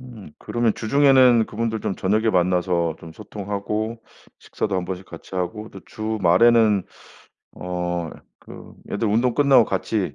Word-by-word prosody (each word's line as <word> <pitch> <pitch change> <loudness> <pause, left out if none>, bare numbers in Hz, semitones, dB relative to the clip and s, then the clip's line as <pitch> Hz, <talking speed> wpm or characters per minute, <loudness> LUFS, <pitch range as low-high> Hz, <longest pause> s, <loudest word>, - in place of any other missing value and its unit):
음 115 -11 -12
그러면 120 -2 -1
주중에는 130 -2 +4
그분들 110 0 -3
좀 95 - -3
저녁에 110 +4 0
만나서 90 -2 0
좀 80 -1 -12
소통하고 105 +3 -5 0.4
식사도 100 -3 -4
1 90 - -1
번씩 95 +1 -6
같이 85 +3 -12
하고 95 +4 -4
또 95 - -11
주말에는 110 0 +2 0.7
어 90 -2 -4 0.4
그 - - -12 0.2
애들 105 +1 -1
운동 115 +3 +1
끝나고 140 -5 +5
같이 95 0 -2
105 Hz, 285 characters per minute, -22 LUFS, 90-115 Hz, 0.7 s, 끝나고